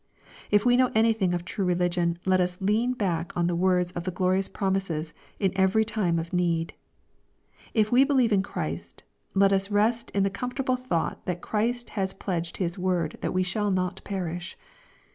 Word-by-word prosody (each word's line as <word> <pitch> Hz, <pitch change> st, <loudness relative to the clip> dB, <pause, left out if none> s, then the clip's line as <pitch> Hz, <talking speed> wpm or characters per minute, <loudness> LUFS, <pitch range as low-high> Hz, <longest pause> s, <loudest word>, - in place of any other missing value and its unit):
If 205 Hz, +1 st, +3 dB
we 245 Hz, 0 st, +5 dB
know 255 Hz, 0 st, +3 dB
anything 220 Hz, -4 st, +3 dB
of 175 Hz, 0 st, -4 dB
true 195 Hz, +2 st, -3 dB
religion 175 Hz, -1 st, +1 dB
let 185 Hz, -1 st, +3 dB
us 180 Hz, 0 st, -1 dB
lean 215 Hz, +6 st, +1 dB
back 175 Hz, -8 st, -2 dB
on 170 Hz, -, +2 dB
the 175 Hz, 0 st, 0 dB
words 180 Hz, 0 st, +2 dB
of 175 Hz, -, -5 dB
the 185 Hz, -, -2 dB
glorious 185 Hz, +1 st, +1 dB
promises 190 Hz, -6 st, -2 dB, 0.3 s
in 195 Hz, -3 st, +2 dB
every 190 Hz, +3 st, +3 dB
time 195 Hz, -6 st, 0 dB
of 165 Hz, +2 st, -4 dB
need. 170 Hz, -2 st, 0 dB, 1.0 s
If 215 Hz, -1 st, +2 dB
we 250 Hz, +2 st, +6 dB
believe 260 Hz, -5 st, +3 dB
in 195 Hz, -, +4 dB
Christ, 195 Hz, -, -5 dB, 0.3 s
let 195 Hz, 0 st, +5 dB
us 195 Hz, +1 st, +1 dB
rest 220 Hz, +3 st, +1 dB
in 200 Hz, -, +1 dB
the 195 Hz, -, +1 dB
com 250 Hz, +5 st, -3 dB
fortable 255 Hz, -2 st, 0 dB
thought 170 Hz, -10 st, -1 dB
that 175 Hz, -1 st, -2 dB
Christ 240 Hz, +3 st, -1 dB
has 190 Hz, -2 st, -2 dB
pledged 175 Hz, -3 st, -3 dB
His 180 Hz, 0 st, -2 dB
word 180 Hz, -4 st, -1 dB
that -, -, -1 dB
we 185 Hz, 0 st, +1 dB
shall 205 Hz, +3 st, 0 dB
not 185 Hz, -2 st, -1 dB
perish. 175 Hz, -2 st, -4 dB
190 Hz, 185 wpm, -26 LUFS, 175-210 Hz, 1.0 s, we